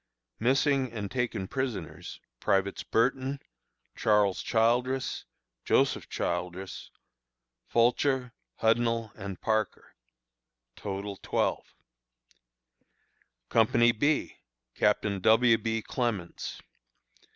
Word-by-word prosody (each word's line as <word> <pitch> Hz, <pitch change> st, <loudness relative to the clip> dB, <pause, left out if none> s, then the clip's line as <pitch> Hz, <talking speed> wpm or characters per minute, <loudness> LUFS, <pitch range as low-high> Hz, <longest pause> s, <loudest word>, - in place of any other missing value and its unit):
Missing 135 Hz, +1 st, +2 dB
and 105 Hz, -3 st, -4 dB
taken 120 Hz, -6 st, -2 dB
prisoners: 125 Hz, -, -4 dB, 0.2 s
Privates 100 Hz, 0 st, +1 dB
Burton, 130 Hz, +4 st, 0 dB, 0.6 s
Charles 105 Hz, -3 st, +2 dB
Childress, 125 Hz, +3 st, +1 dB, 0.4 s
Joseph -, -, +2 dB
Childress, 90 Hz, +2 st, -4 dB, 0.8 s
Fulcher, 125 Hz, +1 st, +2 dB, 0.3 s
Hudnall, 115 Hz, -1 st, +2 dB
and 95 Hz, -2 st, -7 dB
Parker. 110 Hz, -2 st, -1 dB, 0.8 s
Total, 100 Hz, 0 st, -5 dB
12. -, -, -1 dB, 1.7 s
Company 120 Hz, +1 st, +4 dB
B, 145 Hz, +6 st, 0 dB, 0.4 s
Captain 105 Hz, -1 st, +1 dB
W. 115 Hz, +3 st, +5 dB
B. 110 Hz, 0 st, -2 dB
Clements. 115 Hz, -9 st, -3 dB
115 Hz, 75 wpm, -29 LUFS, 100-125 Hz, 1.7 s, W